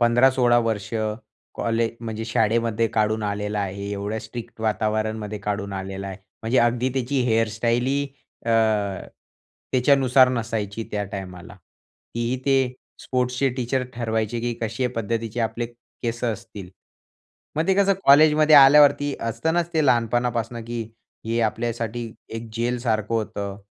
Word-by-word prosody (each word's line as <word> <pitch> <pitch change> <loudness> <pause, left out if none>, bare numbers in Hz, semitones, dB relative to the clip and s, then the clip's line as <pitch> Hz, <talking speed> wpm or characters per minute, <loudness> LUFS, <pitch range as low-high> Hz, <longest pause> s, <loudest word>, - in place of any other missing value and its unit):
15-16 120 +1 +4
वर्ष 110 -4 -1 0.7
कॉलेज 115 0 0
म्हणजे 110 -1 -5
शाळेमध्ये 115 0 +1
काढून 110 0 +1
आलेला 105 0 -2
आहे. 100 +1 -4
एवढ्या 100 +2 -3
स्ट्रिक्ट 120 -1 -9
वातावरणामध्ये 110 -1 -1
काढून 100 0 -3
आलेला 95 0 -5
आहे. 95 - -6 0.3
म्हणजे 115 +3 +1
अगदी 120 +2 +2
त्याची 135 +1 0
हेअरस्टाईलही 115 +5 +1 0.4
अ, - - +1 1.2
त्याच्यानुसार 130 0 +5
नसायची 115 -3 -3
त्या 105 -1 -2
टायमाला. 90 -1 -7 0.6
तीही 130 +2 +1 0.3
स्पोर्ट्सचे 125 +1 0
टीचर 130 +1 0
ते 125 - -15
ठरवायचे, 110 -1 -1
की 120 +1 -1
कशे 115 +3 -1
पद्धतीचे 115 +1 -2
आपले 115 +1 -1
केस 120 0 -7
असतील. 105 -4 -5 0.9
मग 160 +2 +1
ते 190 - +5
कसं 200 0 +4
कॉलेजमध्ये 155 +2 +6
आल्यावरती 145 0 +7
असत 115 +5 -4
ना 175 +1 +3
ते 155 -2 +2
लहानपणापासून 120 -1 +1
की 120 0 -4 0.4
हे 115 +1 0
आपल्यासाठी 115 +1 -2 0.3
एक 115 0 -6
जेल 120 +2 -1
सारखं 110 -2 -1
होतं. 100 -3 -3
115 Hz, 125 wpm, -23 LUFS, 110-125 Hz, 1.2 s, आल्यावरती